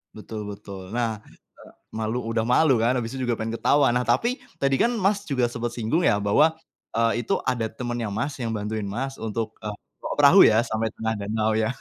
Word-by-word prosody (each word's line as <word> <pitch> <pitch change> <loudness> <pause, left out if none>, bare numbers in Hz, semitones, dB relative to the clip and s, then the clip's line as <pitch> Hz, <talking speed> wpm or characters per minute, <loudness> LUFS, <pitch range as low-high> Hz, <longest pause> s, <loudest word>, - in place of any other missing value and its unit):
Betul 110 0 -7
betul. 100 -2 -9
Nah, 115 -1 -2
eee, - - -21 0.6
malu 110 +2 -1
udah 115 -1 -1
malu 130 +4 +4
kan, 115 +2 +3
habis 115 +2 -5
itu 130 - -3
juga 120 -2 -1
pengen 110 +1 -3
ketawa. 140 +3 +3
Nah 125 - +2
tapi, 180 - +1 0.2
tadi 135 -1 +2
kan 235 - +2
Mas 200 +1 +1
juga 130 -9 0
sempet 120 0 -4
singgung 120 +9 0
ya 105 - +3
bahwa, 105 +11 +4 0.4
eee, 115 +1 +1
itu - - 0
ada 115 -3 0
temannya 120 -2 -4
Mas 120 +8 -2
yang 120 -4 -3
bantuin 105 0 -3
Mas 135 +7 -4
untuk, 110 -1 -4
eee, 105 - -3 0.5
perahu 145 +7 +8
ya? 110 0 +5
Sampai 110 0 -1
tengah 110 0 -2
danau 110 +2 0
ya, 110 0 +1
115 Hz, 200 wpm, -24 LUFS, 110-125 Hz, 0.6 s, perahu